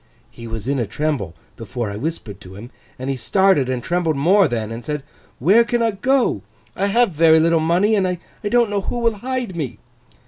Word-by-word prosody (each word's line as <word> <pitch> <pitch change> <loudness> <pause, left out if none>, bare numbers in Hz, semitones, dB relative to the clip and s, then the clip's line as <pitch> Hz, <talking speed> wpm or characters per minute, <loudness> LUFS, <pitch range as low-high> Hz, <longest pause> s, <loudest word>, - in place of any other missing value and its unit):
He 115 - -10
was 110 0 -6
in 140 0 0
a 115 - -1
tremble 140 - -2 0.2
before 115 0 -5
I - - -6
whispered 115 - -5
to 95 -2 -12
him, 115 +6 -10 0.3
and 130 - -6
he 135 - -1
started 190 0 +2
and 125 -2 -2
trembled 170 +1 0
more 185 +8 +4
then, 115 -2 -3
and 115 +1 -6
said, 150 +3 -4 0.3
"Where 195 - +5
can 235 +1 0
I 225 - +2
go? 245 - +1 0.3
I 195 - 0
have 235 +1 +2
very 160 0 +5
little 165 +1 +3
money, 175 +7 +2
and 195 -3 +2
I 180 -1 -2 0.3
don't 235 -1 +2
know 200 -1 0
who 240 - -4
will 230 -2 0
hide 250 -5 -3
me!" 130 -10 -4
160 Hz, 210 wpm, -20 LUFS, 120-200 Hz, 0.3 s, Where